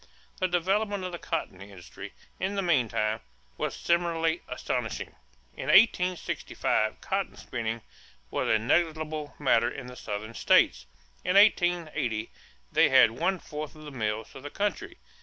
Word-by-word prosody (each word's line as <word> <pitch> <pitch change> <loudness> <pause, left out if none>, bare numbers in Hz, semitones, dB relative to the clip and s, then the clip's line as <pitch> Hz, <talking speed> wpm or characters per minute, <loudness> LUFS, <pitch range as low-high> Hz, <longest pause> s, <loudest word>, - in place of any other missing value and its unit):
The 185 - +2
development 195 +3 0
of 185 - -4
the 175 - -6
cotton 125 - -4
industry, 95 -4 -10 0.3
in 190 +2 -1
the 195 - 0
meantime, 115 - +1 0.4
was - - -3
similarly 170 -1 +1
astounding. 125 -2 -3 0.4
In - - -6
1865 185 -4 +2
cotton - - -2
spinning 115 -1 -4 0.5
was - - -1
a 110 - +5
negligible 155 +4 0
matter 120 -4 +3
in 125 - -7
the 125 0 -9
Southern 110 -1 -5
states. - - +3 0.4
In 180 - 0
1880 170 - +3 0.4
they - - +5
had - - +7
one 180 +10 0
fourth 150 -3 -7
of 155 - -12
the 150 - -8
mills 110 -3 -3
of 135 - -10
the 145 - -7
country. 335 - -3
155 Hz, 140 wpm, -28 LUFS, 115-180 Hz, 0.5 s, had